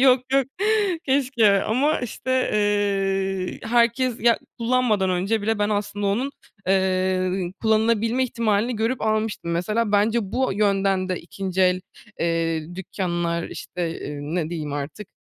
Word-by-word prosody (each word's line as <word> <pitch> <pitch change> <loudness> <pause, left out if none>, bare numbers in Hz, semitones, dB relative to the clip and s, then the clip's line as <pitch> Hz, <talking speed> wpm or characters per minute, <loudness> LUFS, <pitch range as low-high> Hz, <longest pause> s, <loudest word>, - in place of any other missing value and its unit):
Yok, 260 -1 +6
yok, 270 -2 +3 0.6
keşke 245 -7 +3
ama, 275 +8 +1
işte, 255 +2 -1
eee, 195 -2 0
herkes, 235 +1 +2
ya, 235 0 +4 0.2
kullanmadan 230 -5 +2
önce 195 +4 0
bile 220 +1 0
ben 205 0 +1
aslında 205 -1 -1
onun, 240 +8 0 0.4
eee, 185 -1 +1
kullanılabilme 225 +2 +2
ihtimalini 230 -1 0
görüp 230 +4 -1
almıştım. 215 -5 -1
Mesela, 210 +6 0
bence 210 +3 +3
bu 260 -3 +1
yönden 195 -2 +1
de 185 -2 -2
2'nci 190 +2 -4
el, 185 0 +3 0.4
eee, 165 -1 -1
dükkânlar, 175 -2 -2
işte, 180 - -6 0.3
ııı, 145 +2 -5
ne 165 -3 -1
diyeyim 155 -4 -4
artık, 145 +8 -5
205 Hz, 130 wpm, -23 LUFS, 185-230 Hz, 0.6 s, Yok